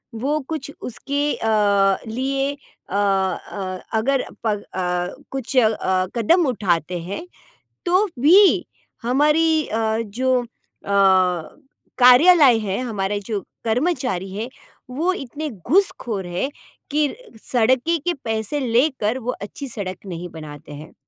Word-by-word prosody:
वो 280 +7 0
कुछ 305 -3 -4
उसके 280 +4 -3
अ, 200 -3 +2
लिए 270 +4 -1 0.4
अ - - -4
अ, 190 -1 -1 0.2
अगर 270 +4 +1 0.2
पग 210 -2 0
अ, 180 -1 -2 0.2
कुछ 270 0 -4
अ, 210 -5 +2
कदम 330 - +3
उठाते 180 - 0
हैं, 200 - -6 0.6
तो 370 +4 +3
भी 370 +8 +6 0.4
हमारी 300 +5 +3
अ, 220 0 0
जो 255 +4 +1
अ, - - -9 1.5
कार्यालय 260 +1 +7
है, 200 -3 -2
हमारे 205 -5 -2
जो 215 -3 -2 0.2
कर्मचारी 235 - -1
हैं, 220 +4 -4 0.4
वो 320 +9 0
इतने 295 +1 -5
घूसखोर 235 - 0
हैं 175 +10 -2 0.4
कि 295 0 +2 0.4
सड़क 260 +7 +2
के 350 - +2
पैसे 220 +5 -2
लेकर 250 -2 +1
वो 250 0 -3
अच्छी 270 +7 -7
सड़क 200 -6 -5
नहीं 180 -1 -6
बनाते 150 -2 -10
हैं। 150 +2 -10
235 Hz, 120 wpm, -21 LUFS, 195-280 Hz, 1.5 s, कार्यालय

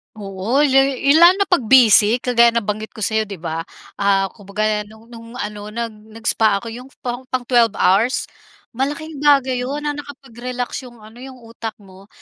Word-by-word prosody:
Oo, 205 +6 -1
la 270 -2 +4 0.2
i 275 +2 +1
lalo 340 +4 +7
na 395 - +1
'pag 360 -2 +2
busy, 235 -2 +5
kagaya 235 -1 +4
nabanggit 215 -1 -2
ko 215 - -5
sa'yo, 220 +1 0
'di 200 - -7
ba. 165 -1 -5 0.3
Ah, 195 -1 +1
kumbaga 210 +1 -3
no'ng 220 +2 -18
no'ng 230 -1 -11
ano, 210 -3 -6
nag 230 +1 -4
nag-spa 220 0 -1
ako 230 +3 -5
'yong 250 +3 -9 0.2
pang 245 +1 -5
pang 255 -1 -2
12 235 -4 +2
hours, 210 +9 +2 0.5
malaking 290 +4 -4
bagay 275 -3 +3
'yon 275 +4 -4
na 295 - -1
nakapag-relax 255 -3 -7
'yong 240 -3 -16
ano, 220 +3 -15
'yong 260 0 -10
utak 225 -1 -7
mo. 190 0 -17
230 Hz, 175 wpm, -19 LUFS, 210-260 Hz, 0.5 s, lalo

